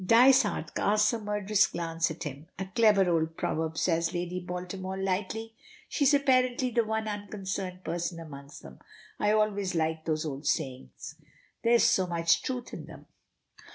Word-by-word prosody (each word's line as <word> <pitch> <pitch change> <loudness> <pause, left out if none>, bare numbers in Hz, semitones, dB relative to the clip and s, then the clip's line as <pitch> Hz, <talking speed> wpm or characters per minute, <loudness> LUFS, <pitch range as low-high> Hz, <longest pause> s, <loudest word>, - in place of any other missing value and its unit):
Dysart 230 -5 +4
casts 210 +2 +2
a 230 - -2
murderous 210 0 +2
glance 165 0 -1
at 160 +1 -6
him. 145 +1 -7
"A 190 - -3
clever 200 -1 +4
old 165 -1 0
proverb," 160 0 -2
says 165 0 +1
Lady 175 +1 -2
Baltimore 180 +2 -5
lightly. 195 +4 -2 0.4
She 285 - +1
is 275 - +5
apparently 255 -2 +2
the 235 0 +2
one 220 0 -2
unconcerned 195 -3 -5
person 170 +1 -3
amongst 140 -3 -10
them. 65 -1 -12 0.4
"I 210 - +2
always 205 -3 +1
like 160 0 -1
those 155 0 -1
old 140 -1 -5
sayings. 130 - -3 0.4
There 230 - +3
is 235 - +5
so 185 -1 +3
much 170 -1 +2
truth 250 -2 -4
in - - -7
them." - - -12
185 Hz, 160 wpm, -29 LUFS, 165-215 Hz, 0.4 s, is